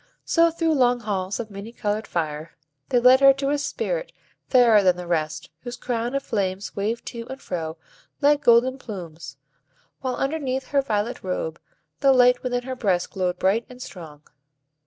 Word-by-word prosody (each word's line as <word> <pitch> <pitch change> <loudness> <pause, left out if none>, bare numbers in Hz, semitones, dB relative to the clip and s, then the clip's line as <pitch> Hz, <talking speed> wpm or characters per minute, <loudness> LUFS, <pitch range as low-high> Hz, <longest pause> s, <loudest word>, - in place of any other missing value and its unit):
So, 335 0 +4
through 330 -1 0
long 245 -3 +3
halls 195 -3 -2
of 220 -2 -5
many 200 +3 -8
colored 215 -2 -2
fire, 155 -1 -4 0.3
they 250 - +2
led 250 +2 +7
her 275 0 +7
to 275 +1 -2
a 290 - +1
Spirit - - -3 0.4
fairer 235 -5 +6
than 185 -2 +3
the 180 - -6
rest, 155 -3 -2
whose 245 +6 -7
crown 240 +1 -2
of 275 - -1
flames 195 -2 -2
waved 215 +4 -2
to 230 0 -8
and 265 +1 -7
fro 160 -7 -5 0.4
like 290 0 +3
golden 250 +3 +4
plumes, 165 - -8 0.6
while, 255 -2 -2
underneath 270 -2 -2
her 280 -1 +3
violet 225 -2 -2
robe, 170 -3 -4 0.4
the 275 -1 +5
light 250 -1 +5
within 245 -1 -2
her 260 +1 -5
breast 190 -7 0
glowed 180 -1 -1
bright 200 +6 +1
and 250 0 -12
strong. 160 -10 -10
235 Hz, 175 wpm, -24 LUFS, 185-260 Hz, 0.6 s, led